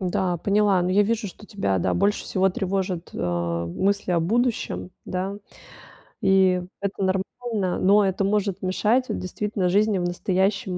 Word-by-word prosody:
Да, 180 -1 0
поняла. 200 0 +2
Но 180 - 0
я 205 +2 +4
вижу, 215 -1 -1
что 210 - -14
тебя, 195 - -1
да, - - 0
больше 200 +3 +1
всего 190 0 +2
тревожат, 185 -2 -2
а, 85 -1 -2
мысли 195 - -1
о 175 - +3
будущем, 195 - -1
да. 190 +2 -3 0.9
И 190 -1 +4 0.2
это 200 0 -3
нормально, 195 +1 -1
но 200 +2 +5
это 190 +1 0
может 200 -1 0
мешать 215 +7 +1
вот - - -2
действительно 190 0 -2
жизни 205 +2 +3
в 175 - -1
настоящем 185 +1 0
190 Hz, 155 wpm, -24 LUFS, 180-205 Hz, 0.9 s, но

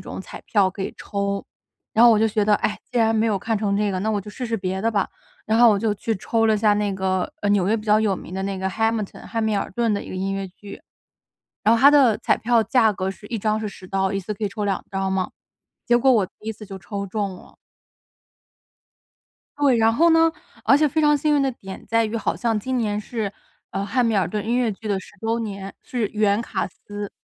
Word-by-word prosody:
种 - - -8
彩 - - -10
票 200 -3 +3
可 195 - -10
以 - - -5
抽。 200 -1 -3 0.5
然 225 - +5
后 240 - +8
我 215 - +3
就 220 +1 +3
觉 210 0 +1
得， 210 0 +4
唉， 210 - -2
既 250 - -1
然 225 -1 +3
没 220 +1 +2
有 215 -3 +1
看 220 +3 -1
成 200 -1 0
这 205 0 +1
个， 185 - -2
那 205 +4 -2
我 210 -2 0
就 210 +2 -10
试 250 +4 -5
试 230 -1 -1
别 190 -1 -3
的 225 - +1
吧。 200 - +1 0.4
然 220 +1 +1
后 240 -1 +8
我 210 - +3
就 220 0 +1
去 225 +2 -2
抽 225 +3 0
了 220 - +4
一 - - +2
下 210 0 +3
那 205 -1 0
个， 190 -1 -1
呃， 205 - +1
纽 200 -3 +3
约 215 +3 +2
比 215 - -6
较 210 0 +4
有 215 -3 +1
名 180 - -9
的 190 - -3
那 195 0 -2
个 190 0 -2
Hamilton 225 0 -2
汉 225 -1 -2
密 220 -1 +1
尔 - - -2
顿 230 +1 +1
的 200 - -1
一 - - -11
个 - - -6
音 190 +1 -2
乐 195 0 -3
剧。 200 +2 -12 0.8
然 225 +2 +5
后 - - 0
它 280 +3 +8
的 265 -7 +5
彩 - - +2
票 235 -1 +2
价 225 -3 +3
格 190 -1 -2
是 200 - -14
一 230 - -3
张 215 +1 0
是 215 - -3
10 190 - -10
刀， 190 +1 0
一 195 - 0
次 210 +4 -4
可 210 - -7
以 - - +1
抽 210 +1 -5
2 195 -2 -2
张 195 0 -2
嘛， 190 -1 -1 0.5
结 240 0 +4
果 265 +3 +3
我 220 -6 +3
第 190 - -22 0.2
一 - - 0
次 210 - -11
就 195 -1 -8
抽 200 +1 -5
中 200 -1 -3
了。 - - -16 2.0
对， 275 -4 +4
然 225 0 +4
后 335 +8 +4
呢， 325 0 +5 0.3
而 275 - +6
且 300 0 +3
非 315 +3 0
常 295 -1 +4
幸 300 +1 +1
运 285 - +3
的 270 - +1
点 195 -5 -10
在 230 0 +2
于 220 +1 -2
好 225 - -1
像 230 -2 0
今 255 +4 -2
年 210 -3 -1
是， 210 -2 -4 0.4
呃， 195 - -2
汉 240 +5 +1
密 230 - +1
尔 190 -5 +2
顿 210 +2 -3
音 235 +2 +1
乐 245 -3 +1
剧 215 +2 -8
的 200 -2 +1
10 - - -11
周 225 +1 0
年， 200 -3 -5
是 240 -4 -2
原 210 0 +1
卡 235 - -2
司。 205 +2 -8
210 Hz, 290 characters per minute, -23 LUFS, 195-230 Hz, 2.0 s, 后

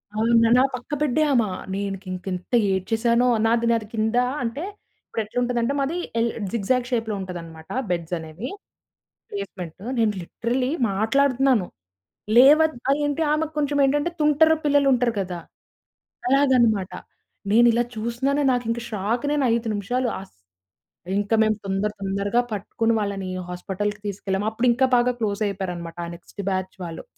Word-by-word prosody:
అవును. 225 +2 +2 0.2
నా 255 - +6
పక్క 250 +3 -10
బెడ్డే 300 +1 +2
ఆమె. 235 -5 +3 0.3
నేను 200 0 -2
కి - - -17
ఇంకెంత 185 +3 -5 0.2
ఏడ్చేసానో. 230 +6 +1 0.2
నాది, 230 +1 +2
నాది 225 -2 0
కింద 220 +2 0 0.3
అంటే 240 +8 -3 0.4
ఇప్పుడెట్లుంటదంటే 240 +3 -1
మాది 280 +5 -1 0.2
ఎల్ 230 0 +2 0.2
జిగ్‌జాగ్ 240 +3 0
షేప్‌లో 225 -3 -1
ఉంటదన్నమాట 165 -3 -8 0.2
బెడ్స్ 170 -1 -2
అనేవి 160 +9 -7 0.8
ప్లేస్‌మెంట్. 190 -3 -6 0.2
నేను 215 -2 +3
లిటరల్లీ 250 - -2 0.2
మాట్లాడుతున్నాను. 255 0 +2 0.7
లేవద్ 300 +4 +7
ఆ! - - +6
ఏంటి? 290 +3 -1
ఆమెకు 310 0 0
కొంచెం 290 -1 0
ఏంటంటే 290 +5 +1
తుంటరు 315 +2 +5
పిల్లలుంటరు 275 -5 +3
గదా! 180 -2 -4 0.9
అలాగనమాట. 250 -8 +3 0.6
నేనిలా 235 +1 +5
చూసినాను 245 +6 0
నాకింక 235 -1 -1
షాక్ 215 +3 -1
నేను 290 -2 +1
5 230 -1 -1
నిమిషాలు 245 +5 -1
అస్ 195 - -14 0.8
ఇంక 205 +2 -2
మేం 215 0 +3
తొందర 195 +2 -1
తొందరగా 200 +4 0
పట్టుకొని 225 +3 0
వాళ్ళని 200 -2 -3 0.2
హాస్పటల్‌కి 200 +4 -3
తీసుకెళ్ళాం. 195 0 -2
అప్పుడు 230 +3 -1
ఇంకా 260 +3 +3
బాగా 245 +1 +3
క్లోస్ 205 -1 -1
అయిపోయారన్నమాట 180 -4 -5
ఆ - - -7
నెక్స్ట్ 175 +3 -9
బ్యాచ్ 185 0 -3
వాళ్ళు. 165 -1 -7
225 Hz, 130 wpm, -23 LUFS, 195-255 Hz, 0.9 s, లేవద్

